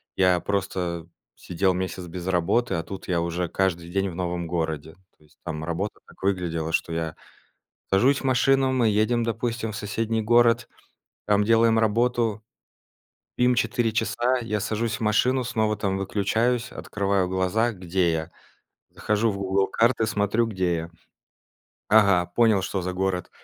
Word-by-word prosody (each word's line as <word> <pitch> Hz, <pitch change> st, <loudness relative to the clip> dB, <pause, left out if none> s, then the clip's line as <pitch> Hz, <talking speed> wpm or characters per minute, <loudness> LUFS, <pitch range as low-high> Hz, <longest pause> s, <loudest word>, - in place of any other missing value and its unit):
я 90 Hz, -2 st, +3 dB
просто 90 Hz, -4 st, -2 dB, 0.3 s
сидел 95 Hz, +2 st, 0 dB
месяц 95 Hz, 0 st, -4 dB
без 90 Hz, +1 st, -7 dB
работы, 95 Hz, +5 st, +1 dB
а 80 Hz, -, -2 dB
тут 95 Hz, +3 st, -8 dB
я 90 Hz, -2 st, +1 dB
уже 85 Hz, +1 st, -2 dB
каждый 85 Hz, -3 st, -1 dB
день 95 Hz, +2 st, 0 dB
в 85 Hz, -, -8 dB
новом 90 Hz, -1 st, -3 dB
городе. 80 Hz, -2 st, -3 dB, 0.2 s
То -, -, -26 dB
есть 75 Hz, -, -27 dB
там 80 Hz, -2 st, -5 dB
работа 85 Hz, +6 st, -3 dB
так -, -, -19 dB
выглядела: 85 Hz, -4 st, -1 dB, 0.2 s
я 80 Hz, -1 st, -3 dB, 0.8 s
сажусь 130 Hz, +9 st, +4 dB
в -, -, -10 dB
машину, 135 Hz, +1 st, +3 dB
мы 125 Hz, -3 st, +2 dB
едем, 110 Hz, +3 st, +2 dB
допустим, 115 Hz, -1 st, -2 dB
в -, -, -6 dB
соседний 110 Hz, +2 st, -2 dB
город, 120 Hz, +1 st, +3 dB, 0.6 s
там 105 Hz, 0 st, +3 dB
делаем 115 Hz, +1 st, +4 dB
работу. 115 Hz, 0 st, +1 dB, 1.0 s
Им 125 Hz, 0 st, +3 dB
4 115 Hz, 0 st, +1 dB
часа, 120 Hz, +3 st, 0 dB
я 105 Hz, -3 st, -2 dB
сажусь 110 Hz, +1 st, -1 dB
в -, -, -13 dB
машину, 125 Hz, +4 st, +2 dB
снова 110 Hz, -3 st, 0 dB
там 95 Hz, -2 st, -1 dB
выключаюсь, 110 Hz, +5 st, 0 dB
открываю 100 Hz, -2 st, -1 dB
глаза: 95 Hz, +6 st, 0 dB
где 90 Hz, -2 st, 0 dB
я? 80 Hz, 0 st, -3 dB, 0.6 s
Захожу 105 Hz, +2 st, 0 dB
в 100 Hz, -, -5 dB
Google 95 Hz, 0 st, +1 dB
Карты, 115 Hz, 0 st, +2 dB
смотрю, 110 Hz, +2 st, +1 dB
где 95 Hz, -5 st, -1 dB
я. 85 Hz, +1 st, -5 dB, 1.0 s
Ага, 100 Hz, -5 st, +5 dB
понял, 110 Hz, -5 st, +4 dB
что 95 Hz, 0 st, -2 dB
за 90 Hz, 0 st, -4 dB
город. 95 Hz, -1 st, -2 dB
100 Hz, 155 wpm, -25 LUFS, 90-115 Hz, 1.0 s, Ага